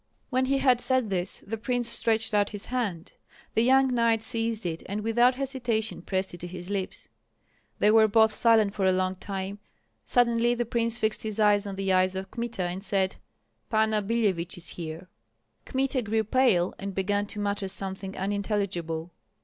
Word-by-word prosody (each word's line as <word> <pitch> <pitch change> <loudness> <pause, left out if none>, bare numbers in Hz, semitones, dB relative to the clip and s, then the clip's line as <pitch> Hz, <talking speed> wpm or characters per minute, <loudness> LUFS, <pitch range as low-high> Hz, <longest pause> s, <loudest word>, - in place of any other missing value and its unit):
When 260 0 +2
he 275 +1 +1
had 255 -3 +3
said 255 -5 +2
this, 180 -1 -2
the 225 +2 -4
prince 245 0 -1
stretched 225 -1 0
out 205 -1 +3
his 205 -1 -4
hand. 210 -10 -3 0.4
The 225 - +3
young 265 +1 +4
knight 230 -2 +2
seized 225 -1 -1
it, 165 -1 -3
and 205 +2 -3
without 240 +3 +3
hesitation 245 -6 -2
pressed 190 +1 -2
it 175 - -9
to 175 - -5
his 180 +1 -8
lips. 195 -2 -4 0.7
They 210 - +4
were 220 0 +6
both 220 +1 +4
silent 220 -3 +4
for 200 -3 -1
a - - +5
long 185 0 0
time; 195 +1 -5 0.4
suddenly 240 -1 +2
the 240 0 -1
prince 230 0 0
fixed 220 -2 0
his 215 -1 -4
eyes 205 -1 +4
on 195 - -5
the 195 -1 0
eyes 185 0 +2
of 190 0 -5
Kmita 235 -5 -3
and 180 +2 -4
said, 195 -2 0 0.5
"Panna 220 -1 +2
Billevich 195 -6 -1
is 170 -3 -4
here!" 165 +1 -7 0.6
Kmita 265 0 0
grew 220 0 0
pale, 220 -6 +2
and 195 -1 -5
began 205 +1 0
to 210 - -7
mutter 200 -1 -1
something 190 0 -3
unintelligible. 190 -5 -2
210 Hz, 180 wpm, -27 LUFS, 190-230 Hz, 0.7 s, were